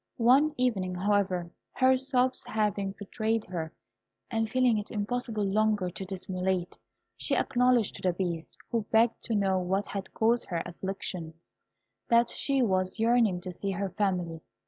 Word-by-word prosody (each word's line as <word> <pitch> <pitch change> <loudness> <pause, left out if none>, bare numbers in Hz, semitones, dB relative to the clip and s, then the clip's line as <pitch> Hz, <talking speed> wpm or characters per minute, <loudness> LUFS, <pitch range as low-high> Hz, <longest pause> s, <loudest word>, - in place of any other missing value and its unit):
One 275 +6 +4
evening, 195 -8 0
however, 185 -2 0 0.2
her 260 0 +4
sobs 255 -1 +1
having 205 -2 -1
betrayed 220 +2 -1
her, 160 -3 -4 0.6
and 225 -1 0
feeling 250 -3 +3
it 210 - -6
impossible 215 0 -2
longer 205 -2 +1
to 190 - -6
dissimulate, 185 -1 -2 0.4
she - - 0
acknowledged 250 -3 +2
to - - -11
the 180 -1 +1
Beast, 170 -3 -4
who 225 -3 -1
begged 230 +1 +3
to 230 - -1
know 195 -2 +2
what 190 +3 0
had 195 -1 -6
caused 235 +2 +2
her 170 -3 -2
afflictions, 175 -2 -5 0.7
that 235 0 +5
she 275 -2 +1
was 185 -3 0
yearning 225 -5 +3
to 185 - -6
see 195 +3 -4
her 195 0 -2
family. 180 -4 -1
205 Hz, 150 wpm, -29 LUFS, 185-235 Hz, 0.7 s, that